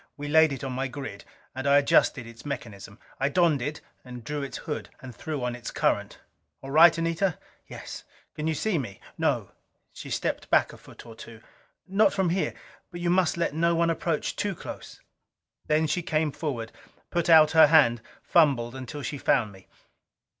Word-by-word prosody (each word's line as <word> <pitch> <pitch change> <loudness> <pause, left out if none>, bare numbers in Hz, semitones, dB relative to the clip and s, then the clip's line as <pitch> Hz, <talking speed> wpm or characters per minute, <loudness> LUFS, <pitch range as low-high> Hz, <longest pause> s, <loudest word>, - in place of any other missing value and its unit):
We 145 0 -6
laid 160 +1 +5
it 135 -2 -5
on 135 - -3
my 130 +2 -2
grid, 125 -7 -8 0.3
and 130 +2 -4
I 140 0 +6
adjusted 140 -2 +3
its 115 0 -13
mechanism. 110 -8 -7 0.2
I 135 - +1
donned 160 -3 +2
it 145 +4 -4 0.2
and 125 -2 -10
drew 150 +4 -4
its 140 - -5
hood, 150 - -5
and 130 -2 -10
threw 145 +4 -5
on 125 0 -2
its 125 -1 -7
current. - - -1 0.5
"All 135 - -7
right, 165 +3 +7
Anita?" 165 +1 0 0.3
"Yes." - - -9 0.3
"Can 155 0 -3
you 160 - 0
see 190 +1 0
me?" 100 -8 -7 0.2
"No." - - 0 0.4
She - - -9
had - - -1
stepped - - -3
back - - +3
a - - -12
foot - - -15
or 115 - -11
two. 115 0 -12 0.5
"Not 195 +3 +3
from 190 -4 +1
here. 185 +2 -1 0.3
But 175 -1 -8
you 175 0 +1
must 180 -2 +2
let 170 -4 -1
no 170 +2 +2
one 165 0 +2
approach 165 -1 -2
too 205 -2 -2
close." - - -9 0.7
Then 155 +1 +2
she 175 +3 -1
came 155 -3 0
forward, 125 -8 -4 0.4
put 170 -1 -1
out 155 -2 +7
her 160 -1 +7
hand, 135 -7 +4 0.2
fumbled 135 -8 +3
until 130 +2 -7
she 135 +3 -4
found 115 -7 +1
me. 95 -1 -17
145 Hz, 190 wpm, -26 LUFS, 125-165 Hz, 0.7 s, right